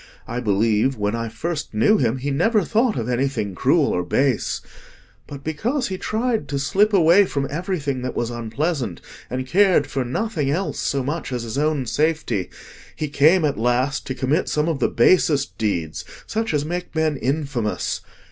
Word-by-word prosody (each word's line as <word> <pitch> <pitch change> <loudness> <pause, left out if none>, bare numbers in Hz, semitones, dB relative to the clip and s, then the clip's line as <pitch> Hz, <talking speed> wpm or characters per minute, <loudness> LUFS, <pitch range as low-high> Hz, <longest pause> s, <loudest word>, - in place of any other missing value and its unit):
I 120 - -3
believe, 110 +3 +1
when 105 0 -1
I 115 0 -3
first 155 +1 -4
knew 165 - +4
him, 120 0 +1
he 140 +2 -3
never 205 +9 +2
thought 225 +5 +1
of 115 -1 -2
anything 125 -5 -1
cruel 90 - +2
or 90 - 0
base. 130 +7 0 0.7
But 140 -1 -9
because 235 - -1
he 185 -1 -4
tried 225 +1 -1
to 140 - -2
slip 195 +10 +2
away 185 +1 +6
from 140 -6 -2
everything 150 -5 -2
that 125 0 -4
was 120 0 -1
unpleasant, 120 - -2 0.3
and 130 +1 -3
cared 185 0 +4
for 135 -1 -2
nothing 145 - -2
else 180 +7 -1
so 140 -1 0
much 150 +2 -3
as 125 -2 -2
his 115 +4 -3
own 150 -3 +1
safety, 150 - 0 0.5
he 155 - -3
came 155 +5 +4
at 140 -6 -1
last 125 +5 0
to 130 - -3
commit 135 +7 0
some 150 +1 0
of 160 -5 -1
the - - +2
basest 140 +1 +3
deeds—such 105 - -3
as 150 -1 0
make 175 +1 -4
men 160 -1 +1
infamous. 135 -5 -2
140 Hz, 175 wpm, -22 LUFS, 120-170 Hz, 0.7 s, away